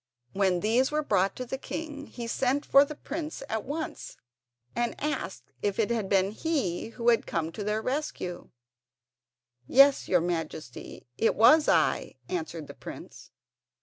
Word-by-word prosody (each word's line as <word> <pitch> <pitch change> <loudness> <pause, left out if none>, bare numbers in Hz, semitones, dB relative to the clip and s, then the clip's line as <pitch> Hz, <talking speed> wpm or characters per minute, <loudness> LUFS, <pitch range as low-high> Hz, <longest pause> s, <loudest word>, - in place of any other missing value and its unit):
When 190 -3 +2
these 235 +5 +3
were 305 +1 0
brought 195 -7 +1
to 255 - -5
the 265 +2 -4
king 295 -2 -6
he 240 - -7
sent 260 +4 0
for 275 - +7
the 300 +1 -6
prince 305 0 -5
at 220 -4 -2
once 310 +4 -5 0.6
and 240 0 0
asked 300 +1 -4
if 205 -1 -1
it 225 0 +1
had 220 -5 -1
been 195 0 +3
he 225 - -1
who 235 +1 0
had 230 - +3
come 165 -1 -2
to 205 - -5
their 210 +2 -1
rescue. 255 -10 -3 1.2
"Yes, 275 +1 +6
your 180 -2 +3
Majesty, 160 -6 -5
it 225 - +3
was 275 +8 +6
I," - - +2
answered 315 - -4
the - - -10
prince. - - -10
235 Hz, 155 wpm, -28 LUFS, 195-285 Hz, 1.2 s, for